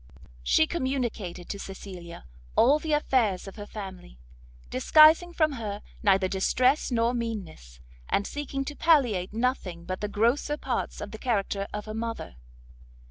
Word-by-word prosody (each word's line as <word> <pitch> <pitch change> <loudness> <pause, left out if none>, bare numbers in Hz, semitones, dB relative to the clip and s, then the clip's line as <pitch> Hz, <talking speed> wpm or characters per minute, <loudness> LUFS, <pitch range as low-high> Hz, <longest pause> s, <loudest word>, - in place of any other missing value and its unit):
She 60 - +4
communicated 245 - -3
to 200 - -4
Cecilia 185 -3 -9 0.3
all 280 +6 +5
the 315 0 -4
affairs 235 -11 +1
of 195 - -9
her 205 0 -7
family, 190 - -9 0.5
disguising 315 - +6
from 310 -3 +2
her 215 -6 -5 0.2
neither 195 -3 +3
distress 250 +9 +2
nor 235 -1 +1
meanness, 195 - -5 0.3
and 200 - +1
seeking 275 0 -4
to 290 - -5
palliate 250 - +3
nothing 210 -7 -2
but 185 +1 -4
the 210 - -1
grosser 235 +8 +1
parts - - -3
of - - -6
the - - -8
character 200 -4 -1
of 210 0 -5
her 215 - -6
mother. 225 - -5
220 Hz, 145 wpm, -27 LUFS, 195-270 Hz, 0.5 s, disguising